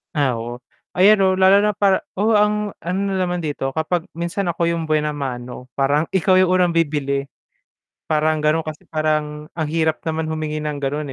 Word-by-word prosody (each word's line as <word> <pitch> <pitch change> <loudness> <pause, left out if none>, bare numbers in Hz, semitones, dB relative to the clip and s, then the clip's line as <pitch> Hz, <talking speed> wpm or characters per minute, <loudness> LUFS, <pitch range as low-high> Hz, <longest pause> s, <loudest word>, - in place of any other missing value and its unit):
Ah, 140 -4 +2
oo. 120 +2 -7 0.3
Ayan 200 +3 +6
'no, 190 -1 +3
lalo 190 +1 +5
na 210 0 +1
para 195 -1 +3 0.2
oo 210 +4 +1
ang 210 0 +1
ano 180 +3 -3
na - - -1
naman 180 -1 -1
dito 140 -3 -3
kapag 160 +2 -1
minsan 170 +3 -2
ako 170 0 -1
yung 165 -1 -3
buena 150 -1 +1
mano 125 -3 -6
parang 145 +3 +1
ikaw 185 0 +3
yung 185 - +4
unang 180 -1 +3
bibili, 145 -4 0 0.8
parang 155 0 +1
ganun 155 +2 +1
kasi 155 -1 -8
parang 155 -1 -2
ang 160 -3 -3
hirap 160 0 0
naman 160 0 -1
humingi 155 -1 -3
ng 150 -1 -3
ganun, 145 0 -3
155 Hz, 185 wpm, -20 LUFS, 150-180 Hz, 0.8 s, Ayan